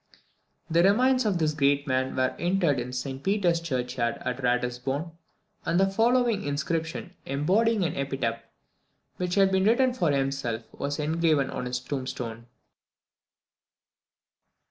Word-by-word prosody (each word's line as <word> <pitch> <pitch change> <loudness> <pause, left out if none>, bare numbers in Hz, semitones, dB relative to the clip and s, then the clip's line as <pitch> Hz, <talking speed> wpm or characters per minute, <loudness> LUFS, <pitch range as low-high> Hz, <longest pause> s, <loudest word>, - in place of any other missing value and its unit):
The 170 +1 +3
remains 250 +6 +4
of 195 -4 +1
this 155 -2 +1
great 140 -1 +2
man 130 -1 0
were 130 0 +1
interred 175 -6 +1
in 125 +1 -4
St 130 +1 -4
Peter's 180 -2 +1
Churchyard 125 -6 -2
at 125 +1 -2
Ratisbon, 125 +5 -1 0.5
and 170 +2 +1
the 195 - +5
following 230 0 +2
inscription, 160 +4 -3
embodying 195 +10 +2
an 165 -2 -1
epitaph 135 -4 -2 0.8
which 180 -1 -2
he 200 - +4
had 195 0 +3
written 230 +7 +3
for 175 -10 +1
himself, 135 -4 -1
was 145 +1 -3
engraven 155 -2 +1
on 125 - -4
his 125 0 -2
tombstone. 125 -3 -5
150 Hz, 130 wpm, -27 LUFS, 130-190 Hz, 0.8 s, the